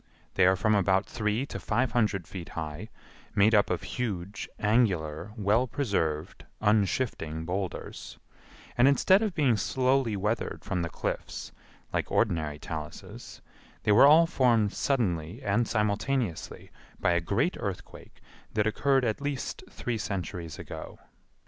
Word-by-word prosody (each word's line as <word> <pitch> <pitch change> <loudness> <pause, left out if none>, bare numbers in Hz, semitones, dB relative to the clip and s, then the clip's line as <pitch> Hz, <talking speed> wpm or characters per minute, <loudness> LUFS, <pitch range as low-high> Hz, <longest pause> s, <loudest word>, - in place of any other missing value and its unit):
They 95 -1 +4
are 95 - +5
from 110 +3 +2
about 95 -1 +3
three 110 +3 -1
to - - -6
five 120 +3 0
hundred 105 -7 +1
feet 90 -3 -8
high, 80 +7 -5 0.5
made 105 +3 +5
up 105 -1 +4
of 90 - -1
huge, 100 -5 -4
angular, 95 -6 +1
well 110 +5 +2
preserved, 95 - -2 0.2
unshifting 105 -6 0
boulders, 95 +1 -5 0.6
and 125 +2 +5
instead 185 - +5
of 210 -6 -1
being 135 -8 +3
slowly 130 +1 +1
weathered 105 +3 -2
from 95 -3 -1
the 85 - -2
cliffs - - -4 0.4
like - - -1
ordinary 75 -3 +1
taluses, 75 -1 -8 0.4
they - - +3
were 120 +7 +8
all 160 +3 +7
formed 120 - +2
suddenly 95 - -1
and 105 +4 +1
simultaneously 105 -1 -1 0.3
by - - +2
a 85 0 +2
great 115 - 0
earthquake 100 -3 -7 0.3
that 105 -1 +2
occurred 135 +4 +2
at 110 +3 -1
least 140 -2 -3
three 120 -3 -3
centuries 90 -5 -4
ago. - - -8
105 Hz, 135 wpm, -28 LUFS, 90-125 Hz, 0.6 s, were